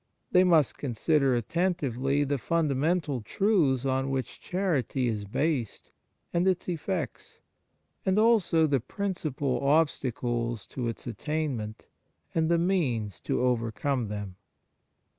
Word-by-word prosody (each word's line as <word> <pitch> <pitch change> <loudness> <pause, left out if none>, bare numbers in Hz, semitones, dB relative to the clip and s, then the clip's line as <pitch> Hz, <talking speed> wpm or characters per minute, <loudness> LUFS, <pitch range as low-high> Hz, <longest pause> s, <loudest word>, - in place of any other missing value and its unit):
They 180 - +6
must 165 -7 +3
consider 135 +1 +2
attentively 140 - 0
the 145 -1 -1
fundamental 155 -1 0
truths 145 - +2
on 135 0 0
which 135 -2 -3
chanty 150 - 0
is 105 -3 -2
based 130 +1 -2 0.4
and 175 +2 +2
its 185 -1 +1
effects, 170 - -4 0.6
as 190 +1 +1
also 215 -8 +4
the 140 -3 +2
principal 140 - -2
obstacles 120 -6 0
to 125 -3 -3
its 115 - -5
attainment, 130 -5 -3 0.5
and 160 -1 +1
the 170 - +4
means 135 - 0
to - - -1
overcome 125 +1 0
them. 100 -3 -6
140 Hz, 115 wpm, -28 LUFS, 120-170 Hz, 0.6 s, They